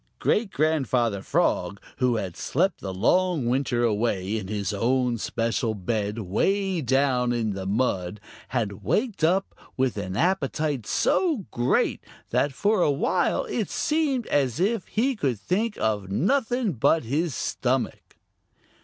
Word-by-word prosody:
Great 215 -1 +1
Grandfather 130 - +1
Frog, - - 0 0.2
who 125 -2 +2
had 95 -6 -3
slept 185 +8 0
the 95 - -4
long 160 - +2
winter 125 -1 +1
away 105 -3 0
in 95 - -7
his 105 -1 -2
own 125 +3 +1
special 115 0 -1
bed 105 +2 -2
way 185 - 0
down 130 -2 +2
in 115 -3 0
the 95 -1 -5
mud, 100 -3 -1 0.3
had 105 -6 -3
waked 215 -6 0
up 185 +4 +2 0.2
with 130 -4 0
an 95 -1 -4
appetite 155 - 0
so 310 - +1
great 120 +2 +1 0.3
that 145 - +2
for 205 +8 +1
a 155 - +4
while 140 0 +1
it - - -2
seemed 295 -6 0
as 135 -3 +1
if 200 +1 0
he 255 +5 0
could 130 - -1
think 205 - -1
of 105 -3 -1
nothing 240 - +1
but 140 +5 +2
his 145 +6 -1
stomach. - - -2
130 Hz, 140 wpm, -25 LUFS, -, 0.3 s, a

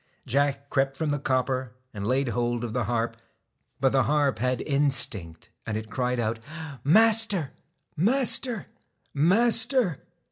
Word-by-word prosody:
Jack 140 +1 -1
crept 135 0 0
from 160 -2 -2
the 145 - -1
copper, 130 -2 -1 0.2
and 100 -1 -5
laid 130 +1 0
hold 120 +1 -2
of 115 -2 -4
the 120 -2 -1
harp. 115 0 -2 0.6
But 135 0 +2
the 130 -3 +2
harp 145 -3 +1
had 125 0 0
instinct, 130 - -2
and 105 -1 -4
it 110 0 -8
cried 125 -1 -1
out: 115 0 -2 0.4
'Master! 210 -3 +4 0.4
Master! 240 - +3 0.5
Master!' 225 - +3
135 Hz, 135 wpm, -26 LUFS, 120-160 Hz, 0.6 s, Master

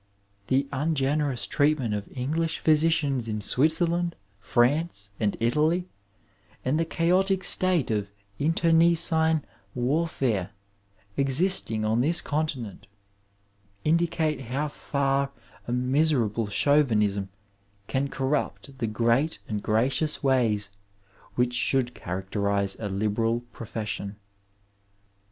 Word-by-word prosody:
The 135 +4 +1
ungenerous 145 -1 0
treatment 145 -6 +1
of 105 -1 -4
English 160 +6 -1
physi 155 0 +4
cians 140 -8 0
in 105 0 -2
Switzerland, 165 - +2 0.2
France, 120 -1 0
and 105 -2 0
Italy, 155 +10 +1 0.8
and 140 +5 +1
the 165 - +1
chaotic 185 +3 +1
state 180 -9 +3
of 105 -2 -1 0.3
internecine 160 0 +3 0.3
warfare 125 - 0 0.6
existing 135 - +2
on 110 +2 +2
this 165 +6 +2
continent, 145 - -3 1.0
indicate 160 -3 +1
how 140 +6 -2
far 140 -1 -1 0.3
a - - -3
miserable 125 -4 +1
Chauvinism 105 -6 +2 0.6
can 135 +5 -1
corrupt 135 0 -3
the 115 - -1
great 115 +8 +1
and 105 -2 -3
gracious 130 +10 0
ways 115 -7 +1 0.7
which 125 0 +1
should 125 0 +1
characterize 100 +1 -2
a 105 - -3
libera 110 +4 0
profession. 110 -3 -6
135 Hz, 100 wpm, -26 LUFS, 110-155 Hz, 1.0 s, physi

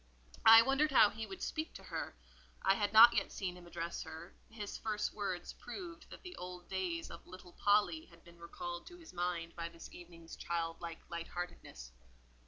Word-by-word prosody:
I 225 +1 +11
wondered 275 +4 +2
how 215 -6 +7
he 220 0 -6
would 385 - -7
speak 315 +1 -3
to - - -9
her; - - -5 0.5
I 195 - +5
had 205 0 0
not 230 +2 +10
yet - - 0
seen 180 -3 -3
him 175 -1 -13
address 170 0 -4
her; 160 +2 -9 0.2
his 210 -2 -6
first 210 -1 -2
words 195 -4 -3
proved 335 +7 -9
that - - -11
the 360 -1 -8
old 180 0 -8
days 180 -3 -3
of - - -11
"little 185 -1 -12
Polly" 210 +11 +2
had - - -19
been 170 0 -17
recalled 175 +1 -6
to 355 - -11
his 330 - -14
mind 175 -1 -2
by 170 0 -4
this 165 -1 -12
evening's 170 -1 -11
child 165 -1 -3
like 170 -1 -7
light 170 0 -4
heartedness. 175 - -7
180 Hz, 190 wpm, -35 LUFS, 170-220 Hz, 0.5 s, I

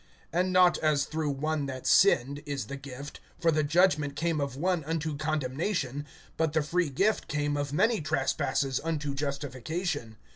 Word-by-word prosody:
(16)And 180 +2 +2
not 185 -1 +5
as 150 -3 +2
through 155 -1 -2
one 145 +1 -1
that 130 -1 -6
sinned, 140 -7 +4
is 140 -2 -3
the 140 - -6
gift; 140 0 -9 0.2
for 170 -2 +3
the 155 0 +2
judgment 150 -2 +2
came 165 -1 0
of 140 -2 -2
one 175 +2 0
unto 160 -1 -2
condemnation, 145 0 -2 0.3
but 160 -2 +1
the 160 -1 +2
free 170 +2 0
gift 195 +11 +1
came 145 0 -1
of 145 -1 -2
many 220 +7 +2
trespasses 135 -2 0
unto 150 -3 -2
justification. 140 - -3
150 Hz, 160 wpm, -29 LUFS, 140-165 Hz, 0.3 s, not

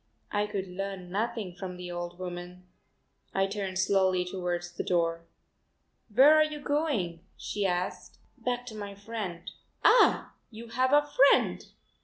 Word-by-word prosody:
I 205 0 +1
could 195 -2 -3
learn 185 -1 -6
nothing 215 -2 -2
from 180 0 -7
the 180 0 -7
old 175 0 -5
woman. 180 0 -7 0.7
I 195 - +3
turned 195 -1 -3
slowly 190 -1 +2
towards 175 -1 -3
the 175 - -4
door. 170 -1 0 0.8
"Where 265 +8 +7
are 310 0 +6
you 305 -1 -4
going?" 285 - -1 0.2
she 205 -2 -2
asked. 180 0 -3 0.2
"Back 245 0 -3
to 225 -3 -8
my 205 -1 -6
friend." 200 -4 -6 0.3
"Ah, - - +5 0.2
you 230 +1 -10
have 255 +3 +1
a 290 0 +5 0.2
friend! - - +2
195 Hz, 145 wpm, -29 LUFS, 180-230 Hz, 0.8 s, Where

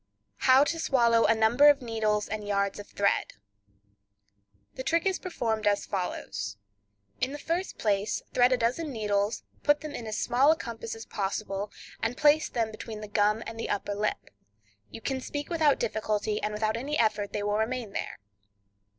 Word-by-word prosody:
How 260 +2 +8
to 330 +3 -2
Swallow 235 -6 +3
a 225 - +4
Number 235 +7 +6
of 290 - +5
Needles 220 -3 0
and 210 -1 -4
Yards 200 0 0
of 205 - -8
Thread.—The 100 - -6
trick 325 +7 +1
is 380 -1 +1
performed 225 - -2
as 205 -1 +2
follows: 100 - -4 0.6
In 265 - -1
the - - -4
first 335 +5 -3
place 205 -1 0
thread 245 +1 +5
a 255 - +4
dozen 255 +7 -1
needles, 210 -2 -1 0.2
put 290 0 +3
them 305 -1 -6
in 230 - -6
as 215 - -3
small 260 +5 +4
a - - +3
compass 230 -6 -6
as 225 - -9
possible, 200 0 -3 0.3
and 230 +3 -1
place 300 +1 +4
them 230 -2 -1
between 215 0 -7
the 210 - -6
gum 210 +1 +2
and 225 0 -7
the - - -3
upper 205 0 -1
lip; 210 +1 -2 0.6
you - - -9
can 265 +1 -2
speak 290 +5 -5
without 315 -4 +3
difficulty, 215 -1 -1
and 210 - -1
without 215 +1 0
any 290 +5 -2
effort 215 -3 +1
they 205 - -2
will 205 +1 0
remain 230 -1 -2
there. - - -4
220 Hz, 175 wpm, -28 LUFS, 205-255 Hz, 0.6 s, How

